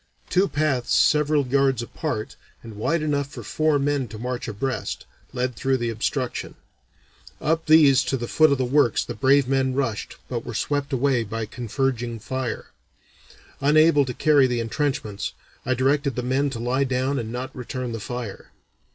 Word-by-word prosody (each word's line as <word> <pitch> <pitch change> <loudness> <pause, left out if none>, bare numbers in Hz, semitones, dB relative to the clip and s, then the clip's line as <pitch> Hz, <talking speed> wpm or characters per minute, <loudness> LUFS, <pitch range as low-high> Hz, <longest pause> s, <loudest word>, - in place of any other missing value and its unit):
Two 190 +2 +3
paths 145 -7 0
several 150 -1 +3
yards 135 -2 +2
apart, 120 -3 -4 0.3
and 115 -2 -9
wide 155 +10 0
enough 145 -2 0
for 130 -5 -9
four 155 +8 +1
men 140 -2 0
to 110 - -9
march 125 +2 -4
abreast, 130 +5 -3 0.3
led 125 -1 -2
through 135 +2 +1
the 120 -2 -2
obstruction. 125 +3 -3 0.8
Up 160 +2 0
these 145 -4 +6
to 135 - 0
the 120 -1 -4
foot 155 +3 +4
of 140 - +3
the 130 - 0
works 130 -2 +2
the - - -5
brave 140 0 +3
men 130 -1 +1
rushed 125 -7 -2
but 120 -2 -3
were 120 - -7
swept 145 +5 -1
away 130 -2 +2
by 115 +1 -4
a - - -2
converging 120 +1 -2
fire. 130 +1 -4 0.9
Unable 150 +1 +5
to 125 - -4
carry 145 -4 +4
the 125 -1 -1
intrenchments, 115 -4 -2 0.3
I 130 - +2
directed 140 +2 +1
the 125 - -2
men 135 +3 +1
to 125 -4 -6
lie 125 +3 +1
down 130 +1 0
and 115 -1 -5
not 125 +2 -5
return 125 0 -5
the 115 - -4
fire. 120 -2 -6
130 Hz, 175 wpm, -24 LUFS, 120-140 Hz, 0.9 s, these